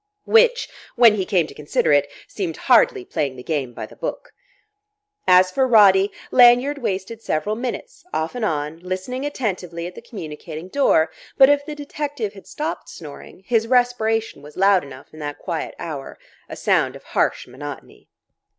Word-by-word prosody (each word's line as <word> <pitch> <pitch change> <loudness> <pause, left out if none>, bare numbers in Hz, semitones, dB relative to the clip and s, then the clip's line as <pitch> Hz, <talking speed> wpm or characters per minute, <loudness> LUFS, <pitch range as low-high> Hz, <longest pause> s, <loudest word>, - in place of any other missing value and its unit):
Which, 475 +2 +4 0.3
when 235 -3 +7
he 195 -3 -1
came 180 -6 +2
to - - -11
consider 150 0 0
it, 145 0 +3 0.2
seemed 180 -6 -4
hardly 450 -6 +3
playing 145 - -2
the 125 - -10
game 140 -5 -2
by - - -7
the - - -15
book. - - -6 0.9
As 185 0 +6
for 260 +7 +2
Roddy, 200 -4 +6 0.2
Lanyard 250 +3 +5
wasted 210 -1 -4
several 210 +3 -1
minutes, 255 - -6
off 160 +1 -2
and 245 -2 -4
on, 155 -4 -2
listening 185 +10 -4
attentively 180 - -4
at 180 - -7
the - - -11
communicating 160 -3 -8
door; 165 - +3 0.3
but 265 0 +8
if 290 0 +3
the 300 - -5
detective 285 -6 -4
had 195 - -14
stopped 305 +2 -5
snoring, 155 +3 -11
his 225 -2 +1
respiration 225 - +1
was 150 +1 -14
loud 195 -1 +4
enough 135 0 -13
in 155 - -12
that 145 -1 -5
quiet 170 -4 -4
hour, 150 -5 -7 0.3
a - - -6
sound - - +1
of - - -12
harsh - - 0
monotony. 145 +4 -10
195 Hz, 170 wpm, -21 LUFS, 160-245 Hz, 0.9 s, but